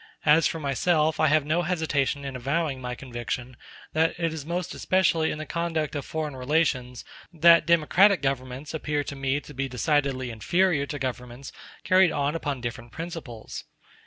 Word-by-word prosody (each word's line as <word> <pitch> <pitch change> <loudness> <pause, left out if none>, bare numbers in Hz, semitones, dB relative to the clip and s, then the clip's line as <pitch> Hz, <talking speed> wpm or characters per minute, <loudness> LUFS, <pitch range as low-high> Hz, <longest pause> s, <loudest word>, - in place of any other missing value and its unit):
As 155 +1 +5
for 165 - -4
myself 155 +2 +1
I 155 - +4
have 155 -1 +3
no 155 +4 +1
hesitation 155 -5 -1
in 135 -1 -5
avowing 140 +1 -1
my 125 0 -4
conviction, 120 0 -5 0.4
that 160 +2 +1
it 165 -2 0
is 155 -2 -7
most 180 +1 -3
especially 180 -4 +2
in - - -3
the 155 - -5
conduct 165 -2 -2
of 145 - -2
foreign 155 -3 -3
relations 130 -3 0 0.3
that 170 0 +6
democratic 170 +3 +4
governments 135 +2 -3
appear 150 -2 -1
to 140 - -6
me 135 +1 0
to 150 - -12
be 135 0 -3
decidedly 130 -1 0
inferior 155 - +1
to 145 - -4
governments 125 0 -5 0.3
carried 185 -1 +5
on 145 +1 0
upon 145 -5 -3
different 120 0 -6
principles. 160 -9 -7
150 Hz, 165 wpm, -26 LUFS, 130-165 Hz, 0.4 s, that